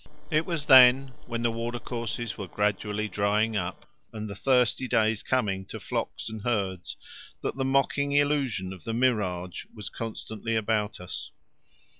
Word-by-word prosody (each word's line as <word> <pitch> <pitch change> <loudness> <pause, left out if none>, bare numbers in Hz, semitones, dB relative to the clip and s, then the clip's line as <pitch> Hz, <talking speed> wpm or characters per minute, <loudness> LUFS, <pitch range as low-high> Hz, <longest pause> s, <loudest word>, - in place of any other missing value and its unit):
It 155 +1 +2
was 165 -4 -2
then, 130 -1 +8 0.2
when 115 -1 -3
the 120 - +2
water 115 +1 -3
courses 120 -2 -4
were 100 - -6
gradually 105 +2 -1
drying 105 +2 +1
up 90 -2 -3 0.3
and 110 -1 -5
the 100 - -6
thirsty 125 +3 +2
days 110 -2 +2
coming 100 -7 0
to - - -7
flocks - - -3
and 110 -1 -5
herds, 100 -6 -2 0.5
that - - -2
the 135 0 -1
mocking 135 +1 +2
illusion 140 -10 +1
of 90 - -12
the 115 - -3
mirage 100 -8 0
was 105 -3 -6
constantly 115 0 -4
about 105 -1 0
us. 90 - -6
110 Hz, 155 wpm, -27 LUFS, 105-125 Hz, 0.5 s, then